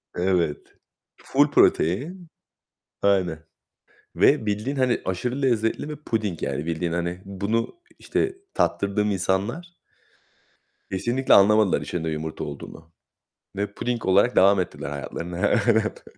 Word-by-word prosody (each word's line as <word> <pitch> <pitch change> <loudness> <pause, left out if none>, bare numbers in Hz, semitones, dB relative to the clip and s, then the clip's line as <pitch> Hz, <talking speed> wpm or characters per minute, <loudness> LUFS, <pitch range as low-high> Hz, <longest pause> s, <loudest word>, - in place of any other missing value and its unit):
Evet, 90 -4 -1 0.4
ful - - +1
protein. 160 - +2 0.7
Aynen 90 -5 +2 0.8
ve 140 -7 +4
bildiğin, 105 +7 -2
hani, 130 -2 +1
aşırı 125 +9 -2
lezzetli 120 +2 0
ve 150 - -5
puding 110 - -3
yani 75 - -2
bildiğin, 85 +1 -2
hani, 85 +1 -3
bunu, 105 - -3 0.2
işte, 390 -1 -1 0.2
tattırdığım 105 +1 0
insanlar 105 - -2 1.2
kesinlikle 120 +8 +1
anlamadılar 100 -4 +5
içinde 80 +2 -3
yumurta 80 0 -4
olduğunu 75 +2 -9 0.6
ve 100 +1 -3
puding 120 0 -3
olarak 100 +6 +3
devam 100 +1 +5
ettiler 90 - -4
hayatlarına. 85 +5 -3 0.2
Evet. 110 -2 +1
100 Hz, 110 wpm, -24 LUFS, 90-120 Hz, 1.2 s, anlamadılar